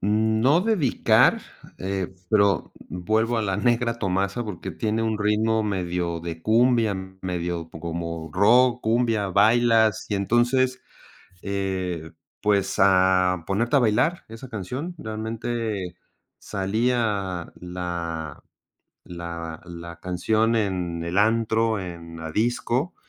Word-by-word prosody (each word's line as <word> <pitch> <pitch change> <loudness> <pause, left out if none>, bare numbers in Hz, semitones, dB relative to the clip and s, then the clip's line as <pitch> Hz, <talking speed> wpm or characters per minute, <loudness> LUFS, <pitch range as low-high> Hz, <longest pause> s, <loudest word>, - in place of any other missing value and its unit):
No 110 - +3
dedicar, 190 - +3 0.4
eh, 95 -1 -3 0.2
pero 100 -2 +3 0.2
vuelvo 110 +6 0
a 110 - 0
la 95 -2 -1
negra 115 +2 +1
Tomasa, 100 +2 -1
porque 95 -6 -6
tiene 110 -1 -1
un 110 -1 -1
ritmo 110 +1 +1
medio 90 -4 -2
de 85 -1 -6
cumbia, 115 +1 +3 0.3
medio 85 -2 -3
como 85 0 -5
rock, 120 +7 +4
cumbia, 115 -2 +1
bailas, 110 +2 +3
y 105 - -1
entonces, 120 +5 +2 0.6
eh, 95 -4 -3 0.3
pues, 100 -2 +1
a 95 -2 +4
ponerte 115 +8 +1
a - - +7
bailar 120 +9 +1
esa 115 +4 -10
canción, 125 - -5
realmente 110 - -4 0.4
salía 100 -3 -1
la 85 -3 -5 0.6
la 85 -2 -7
la 85 -1 -9
canción 110 +6 +1
en 90 -5 -1
el 85 +2 -3
antro, 110 +1 +2
en 85 -2 -8
la 80 -1 -6
disco, 120 - 0
105 Hz, 110 wpm, -24 LUFS, 90-115 Hz, 0.6 s, a